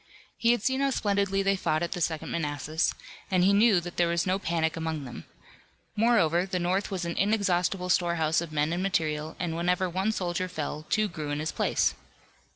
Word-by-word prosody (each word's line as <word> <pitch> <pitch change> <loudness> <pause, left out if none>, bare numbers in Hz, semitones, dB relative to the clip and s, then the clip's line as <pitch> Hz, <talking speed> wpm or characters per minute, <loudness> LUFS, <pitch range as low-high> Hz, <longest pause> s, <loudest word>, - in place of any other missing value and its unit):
He 230 - +1
had 240 -4 0
seen 260 +1 +1
how 275 - +2
splendidly 200 -5 0
they 195 0 +2
fought 155 -4 0
at 170 - -3
the 175 - -3
Second 160 -1 -2
Manassas, 155 0 -1 0.3
and 185 -2 +3
he 195 +2 +5
knew 205 -2 +5
that 175 0 -8
there 175 - +3
was 170 0 0
no 185 +1 +1
panic 165 -3 0
among 160 -2 -3
them. 120 - -9 0.7
Moreover, 195 -6 +3
the 185 - -2
North 180 +3 0
was 185 -3 -3
an 170 - -3
inexhaustible 190 -3 +1
storehouse 170 -3 +2
of 170 -2 -6
men 150 +1 0
and 175 - -1
material, 155 -5 -1
and 170 -2 -2
whenever 180 +2 +1
one 190 +5 0
soldier 185 -2 -2
fell 155 -2 -5
two 215 -1 +2
grew 155 -5 -6
in 145 - -1
his 155 +1 -2
place. - - +1
175 Hz, 200 wpm, -28 LUFS, 160-195 Hz, 0.7 s, he